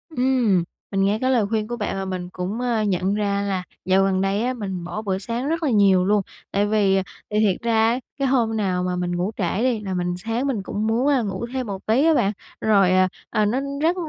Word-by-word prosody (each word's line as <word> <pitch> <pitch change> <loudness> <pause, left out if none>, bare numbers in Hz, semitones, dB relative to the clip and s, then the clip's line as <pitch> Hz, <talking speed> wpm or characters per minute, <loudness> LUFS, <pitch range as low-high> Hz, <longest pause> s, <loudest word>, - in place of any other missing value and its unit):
Ừm, 245 -8 +2 0.3
mình 195 -1 +1
nghe 200 +2 +2
cái 260 - +2
lời 235 -5 +3
khuyên 215 -1 -1
của 240 +1 -4
bạn 205 -3 -2
và 195 - -3
mình 185 -2 -4
cũng, 185 +5 -4
ơ, 235 -3 0
nhận 190 -2 0
ra 200 -1 0
là 195 -2 -2 0.2
dạo 190 +1 +4
gần 190 -1 +1
đây 195 +3 0
á 255 +1 0
mình 190 -7 -5
bỏ 180 +5 -5
bữa 195 -3 -1
sáng 235 +7 -3
rất 330 +2 -1
là 300 - +2
nhiều 195 -5 +4
luôn. 205 +1 +3 0.3
Tại 200 +1 +2
vì 200 -2 +2 0.3
thì 210 - +1
thiệt 205 -3 +2
ra 225 -1 +3
á, 245 +2 0 0.2
cái 275 - +1
hôm 235 -4 +1
nào 185 -4 0
mà 180 0 -1
mình 175 0 -2
ngủ 180 +4 -1
trễ 190 +2 -1
đi 250 -3 +1
là 195 -3 -4
mình 175 -1 -1
sáng 225 +8 -2
mình 225 -8 -1
cũng 210 +3 -2
muốn, 235 +5 +1
a, 275 -4 +3
ngủ 200 +2 -3
thêm 260 -2 -2
một 195 -2 -6
tí 240 +7 +3
á 325 - +5
bạn. 200 -9 +2 0.3
Rồi, 200 -4 +4
ờ, 185 0 +4 0.2
à, 215 -1 +1
nó 240 +6 +1 0.2
rất 335 +3 +3
205 Hz, 250 wpm, -23 LUFS, 190-235 Hz, 0.3 s, á